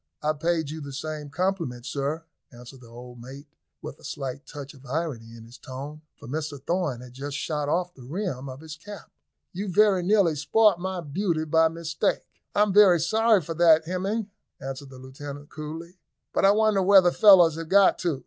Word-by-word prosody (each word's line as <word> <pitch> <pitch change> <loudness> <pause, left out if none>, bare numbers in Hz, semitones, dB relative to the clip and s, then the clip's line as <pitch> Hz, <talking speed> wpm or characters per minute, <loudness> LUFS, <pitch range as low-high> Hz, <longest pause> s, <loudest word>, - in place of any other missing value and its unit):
"I 155 +1 +1
paid 160 -1 -1
you 160 0 -7
the 140 -1 -8
same 150 +1 -6
compliment, 160 -7 -2
sir," 140 +5 -3 0.3
answered 125 +2 -13
the 120 - -14
old 120 +1 -12
mate, 135 +4 -11 0.4
with - - -8
a - - -20
slight 135 0 -6
touch 145 0 -9
of 135 -2 -17
irony 130 -5 -4
in 115 - -12
his 120 +2 -15
tone, 140 +4 -8 0.2
for - - -13
Mr 145 +1 -4
Thorn 150 -4 -2
had 125 -1 -12
just 140 +2 -5
shot 150 -1 -3
off 180 +2 -1
the 135 - -16
rim 140 -1 -4
of 130 +2 -9
his 160 -1 -9
cap. 205 +5 -11 0.4
"You 195 +3 -4
very 205 -1 +4
nearly 185 -3 +3
spoilt 210 +5 +3
my 185 0 -4
beauty 165 +1 -2
by 160 +1 +4
mistake." 165 0 -2 0.3
"I 205 - +5
am 205 -2 -1
very 195 -4 +6
sorry 220 +3 +3
for 165 - -5
that, 160 -1 +5
Hemming," 195 +4 -3 0.3
answered 135 +1 -7
the 130 - -12
lieutenant 140 +2 -10
coolly; 165 +4 -8 0.3
"but - - +2
I - - +7
wonder 215 -1 +2
where 195 +1 +7
the 175 -1 +2
fellows 180 -6 +7
have 165 -1 -7
got 200 +1 +5
to. 165 -7 -1
160 Hz, 195 wpm, -25 LUFS, 140-185 Hz, 0.4 s, I